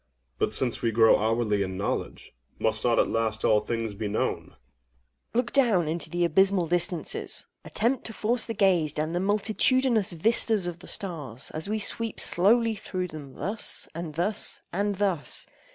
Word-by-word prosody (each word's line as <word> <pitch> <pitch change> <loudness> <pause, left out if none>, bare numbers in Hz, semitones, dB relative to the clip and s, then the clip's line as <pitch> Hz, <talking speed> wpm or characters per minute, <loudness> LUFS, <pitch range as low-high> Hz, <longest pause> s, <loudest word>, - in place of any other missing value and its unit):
OINOS. 60 0 -47
But, - - 0
since 125 -3 -3
we 115 - +1
grow 110 0 +4
hourly 110 -1 0
in 95 -1 -3
knowledge, 100 - -4 0.2
must 110 0 -1
not 120 -1 +2
at - - +3
last 110 -1 -2
all 105 - +4
things 115 0 -4
be 105 +1 -4
known? 105 - -2
AGATHOS. - - -36
Look 240 0 0
down 225 - +3
into 165 +2 -2
the 175 0 0
abysmal 190 +2 +3
distances!—attempt 175 +7 -1
to 225 - -3
force 230 +2 +1
the 225 - -4
gaze 175 -7 +2
down 155 +1 -2
the 175 - -1
multitudinous 215 +3 +2
vistas 215 +2 +3
of 175 -1 -4
the - - -13
stars, 145 - -4
as 155 +5 -4
we 215 - -1
sweep 225 +1 0
slowly 225 +5 +3
through 185 -3 -5
them 145 -4 -10
thus—and 175 -6 -3
thus—and 200 +2 0
thus! 190 -6 0
170 Hz, 165 wpm, -26 LUFS, -, 0.2 s, grow